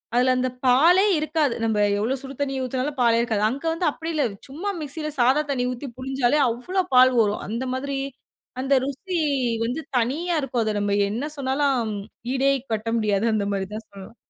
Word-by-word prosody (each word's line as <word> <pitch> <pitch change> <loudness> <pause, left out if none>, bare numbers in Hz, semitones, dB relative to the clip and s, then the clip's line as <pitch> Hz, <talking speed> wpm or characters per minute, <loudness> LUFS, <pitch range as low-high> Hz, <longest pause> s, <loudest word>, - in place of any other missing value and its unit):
அதுல 255 +1 +4
அந்த 255 0 0 0.2
பாலே 330 +10 +5
இருக்காது. 305 -4 0
நம்ப 215 -2 +1 0.2
எவ்ளோ 235 +6 0
சுடு 275 0 -8
தண்ணி 270 -1 -1
ஊத்தினாலும் 260 +3 -3
பாலே 230 -1 +4
இருக்காது. 220 -3 0
அங்க 270 +6 -5
வந்து 335 0 -1
அப்டி 325 +3 -5
இல்ல. 300 -3 +1 0.3
சும்மா 330 +9 -4
மிக்ஸில 305 +1 -4
சாதா 260 +5 +4
தண்ணி 250 -2 0
ஊத்தி 250 +3 -6
புழிஞ்சாலே 265 +1 +1
அவ்ளோ 360 +12 -1
பால் 255 +1 +8
வரும். 205 -1 0
அந்த 230 +5 -3
மாதிரி, 275 +1 -3 0.6
அந்த 270 +1 +1
ருசி 340 +7 -4 0.5
வந்து 260 +7 -2 0.2
தனியா 300 +9 0
இருக்கும். 250 -4 -1
அத 215 - 0
நம்ம 205 0 0 0.2
என்ன 235 +7 -2
சொன்னாலும் 270 -2 +1 0.5
ஈடே 270 +1 +3 0.2
கட்ட 220 +1 -3
முடியாது 210 -1 +1
அந்த 205 -2 0
மாரி 195 -1 -2
தான் 220 +1 -6
சொல்லலாம். 200 +3 -12
260 Hz, 175 wpm, -24 LUFS, 230-285 Hz, 0.6 s, பால்